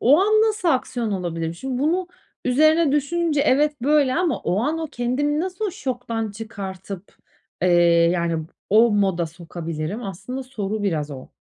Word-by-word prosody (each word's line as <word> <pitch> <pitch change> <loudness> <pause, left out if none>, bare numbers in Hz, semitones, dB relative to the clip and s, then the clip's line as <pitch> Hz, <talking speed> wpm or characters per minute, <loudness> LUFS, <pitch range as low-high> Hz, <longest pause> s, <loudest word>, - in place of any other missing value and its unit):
o 280 +7 +6
an 430 +2 +4
nasıl 425 -5 +1
aksiyon 245 -5 0
alabilirim? 165 -3 -3
Şimdi 255 +6 -4
bunu 355 +4 +1 0.4
üzerine 310 +3 +4
düşününce 295 +1 +1
evet, 290 -1 +2
böyle 285 -1 +3
ama 355 -1 +1
o 190 +4 0
an 315 +4 0
o 320 - -3
kendimi 290 +5 0
nasıl 370 +3 -3
o - - -2
şoktan 245 - -3
çıkartıp, 200 -3 -8 0.5
eee, 185 - +4 0.4
yani, 165 -2 -1 0.2
o 225 +3 +6
moda 190 -5 +1
sokabilirim? 165 +3 -5
Aslında 200 +8 -5
soru 215 -5 -4
biraz 155 -7 -1
o. 130 -2 -9
245 Hz, 150 wpm, -22 LUFS, 190-300 Hz, 0.5 s, o